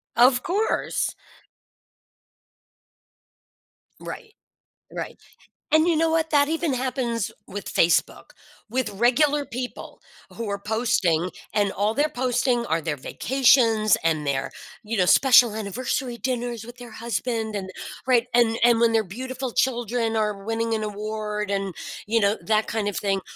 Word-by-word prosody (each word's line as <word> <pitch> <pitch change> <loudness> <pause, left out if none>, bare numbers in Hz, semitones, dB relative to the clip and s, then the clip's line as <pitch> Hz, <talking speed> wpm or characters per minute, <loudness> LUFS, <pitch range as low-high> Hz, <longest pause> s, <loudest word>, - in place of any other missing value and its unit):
Of 245 +1 +5
course. 410 +5 -1 2.9
Right. 440 -3 -8 0.6
Right. - - -6 0.5
And 315 +2 +5
you 335 - +3
know 325 +1 +2
what? 320 0 +1
That 285 -1 +4
even 325 -1 0
happens 250 -4 -2 0.2
with 200 +1 -6
Facebook, 170 - +2 0.4
with 255 +2 -1
regular 280 +7 +2
people 250 -1 -7 0.3
who 230 -2 -5
are 200 0 -2
posting, 200 -6 0 0.2
and 205 -2 +1
all 210 +2 0
they're 290 +4 +2
posting 250 -2 0
are 160 +1 0
their 155 -2 -3
vacations 230 - +3
and 155 -2 +1
their, 135 -1 -2 0.3
you 220 +2 -3
know, 180 -3 +3
special 245 -3 +6
anniversary 240 +4 -3
dinners 240 -1 -3
with 240 +1 -11
their 245 -2 -11
husband 225 -1 -3
and 190 -1 -5 0.4
Right, 245 -2 +3
and 235 -2 +3
and 240 -1 +5
when 230 0 +3
their 225 -1 +3
beautiful 255 +6 -5
children 240 -2 0
are 210 -2 -1
winning 225 +1 -1
an 215 - -2
award 210 0 -4
and, 195 -3 -2 0.3
you 230 +2 +2
know, 200 +1 +2
that 215 0 +2
kind 220 -2 -2
of 205 - -4
thing. 195 -1 0
230 Hz, 140 wpm, -24 LUFS, 210-255 Hz, 2.9 s, special